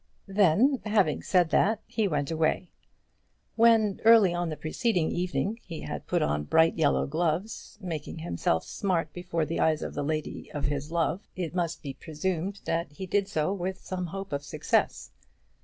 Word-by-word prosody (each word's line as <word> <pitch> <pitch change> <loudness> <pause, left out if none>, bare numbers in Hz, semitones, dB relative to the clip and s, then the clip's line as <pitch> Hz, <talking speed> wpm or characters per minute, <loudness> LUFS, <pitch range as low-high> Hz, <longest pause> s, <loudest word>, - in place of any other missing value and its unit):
Then, 205 - +3
having 205 -8 +2
said 180 -4 +2
that, 215 +6 +3
he 220 -2 0
went 150 -3 -1
away. 160 +3 0 0.8
When 225 -3 +4
early 220 -5 +7
on 175 -1 -1
the 155 - -5
preceding 175 0 0
evening 185 +5 -1
he 165 -3 -8
had - - -6
put - - +1
on 75 0 0
bright 160 - +4
yellow 155 -4 +2
gloves, 170 +10 -2
making 165 -6 -5
himself 85 - -1
smart 185 -5 -1
before 175 -3 -2
the 165 +3 -3
eyes 155 -1 +2
of - - -5
the 145 - -3
lady 155 +1 -3
of 145 - -2
his 145 +1 -2
love, 170 +3 -1
it 175 -3 -4
must 170 -3 -2
be 140 -2 -5
presumed 175 +7 -3
that 165 -3 -2
he 190 +6 -6
did 200 +1 +1
so 160 -1 0
with 190 0 -3
some 180 -1 -3
hope 195 0 -6
of 140 0 -2
success. - - 0
175 Hz, 175 wpm, -28 LUFS, 155-195 Hz, 0.8 s, early